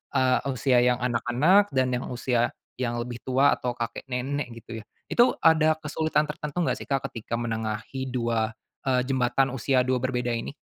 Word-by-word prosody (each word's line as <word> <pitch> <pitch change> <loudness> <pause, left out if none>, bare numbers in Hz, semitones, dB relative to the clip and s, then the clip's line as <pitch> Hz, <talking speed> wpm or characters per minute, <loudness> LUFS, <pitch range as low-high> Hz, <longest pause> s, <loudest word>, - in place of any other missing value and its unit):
eee, 130 -1 +3
usia 130 0 +2
yang 125 -1 +3
anak-anak 125 - +3
dan 130 -1 +2
yang 125 - -2
usia, 120 -1 0 0.3
yang 120 -2 -1
lebih 120 -1 -7
tua 135 +2 +3
atau 125 -1 -3
kakek 115 +3 -5
nenek 130 +3 -2 0.2
gitu 115 0 -7
ya - - -17 0.3
itu 240 +1 +5 0.2
ada 155 -1 +5
kesulitan 155 0 0
tertentu 150 +1 -6
enggak - - 0
sih - - -8
Kak 135 -2 0
ketika 115 0 -4
menengahi 115 +3 -3
dua, 115 -3 0 0.4
eee, 125 -1 +3
jembatan 130 0 +1
usia 130 0 +1
dua 130 -1 0
berbeda 125 -2 -1
ini. 115 +4 -4
125 Hz, 175 wpm, -26 LUFS, 120-135 Hz, 0.4 s, itu